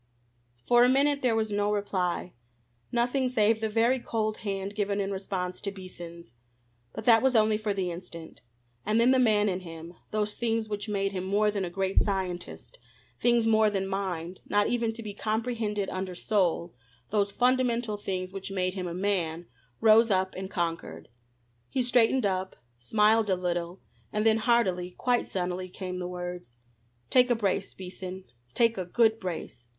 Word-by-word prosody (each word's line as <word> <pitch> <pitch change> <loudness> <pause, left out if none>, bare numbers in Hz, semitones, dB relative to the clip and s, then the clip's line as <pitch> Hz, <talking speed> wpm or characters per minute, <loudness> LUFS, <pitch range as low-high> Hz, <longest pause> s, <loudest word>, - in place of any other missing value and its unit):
For 240 0 +5
a 250 - +5
minute 280 +2 +3
there 245 -3 +2
was 220 -1 0
no 205 0 +1
reply, 185 -4 -1 0.6
nothing 250 +2 +1
save 220 -2 +2
the 220 - 0
very 230 +4 +2
cold 215 -2 -2
hand 195 -1 -4
given 205 -1 -1
in 200 0 -1
response 190 -2 -4
to 200 - -3
Beason's. 175 - -10 0.6
But 220 - -7
that 225 -2 +7
was 265 -1 +2
only 215 -1 +4
for 215 0 -2
the 190 -3 -1
instant. 170 -5 -9 0.4
And 215 +2 +1
then 240 +2 +5
the 260 - +4
man 215 -4 +4
in 185 -2 -1
him, 165 -1 -9 0.2
those 210 -1 -1
things 225 -1 -1
which 210 0 -4
made 195 -1 0
him 185 -2 -3
more 210 +2 +2
than 200 -2 -2
a 180 - -2
great 190 +2 +1
scientist, 190 - -3 0.4
things 235 -1 +3
more 220 -1 +4
than 195 -2 -1
mind, 185 -3 -3
not 205 +1 +3
even 235 -2 0
to 230 0 -6
be 210 -1 -6
comprehended 215 -1 -2
under 185 -1 -4
soul, 175 -4 0 0.4
those 200 -1 +1
fundamental 245 -2 +1
things 185 -2 -4
which 195 0 -6
made 185 -1 -1
him 185 -2 -4
a 170 - -5
man, 175 -4 -1 0.4
rose 225 +1 +6
up 190 -1 +1
and 190 0 -5
conquered. 165 - -3 0.6
He 260 - 0
straightened 245 0 +3
up, 190 -1 -1 0.2
smiled 215 - +3
a 190 - +3
little, 175 0 -3 0.3
and 210 +1 -1
then 220 0 +5
heartily, 185 -6 +1
quite 245 -1 +1
sunnily, 185 0 -3
came 185 -1 -5
the 180 - -3
words: 180 -8 -6 0.6
"Take 250 -1 +5
a 240 - +4
brace, 200 -3 -1
Beason 185 0 -7 0.3
take 230 -3 +3
a 185 - -2
good 225 +4 +2
brace. 175 - -6
200 Hz, 175 wpm, -28 LUFS, 185-225 Hz, 0.6 s, that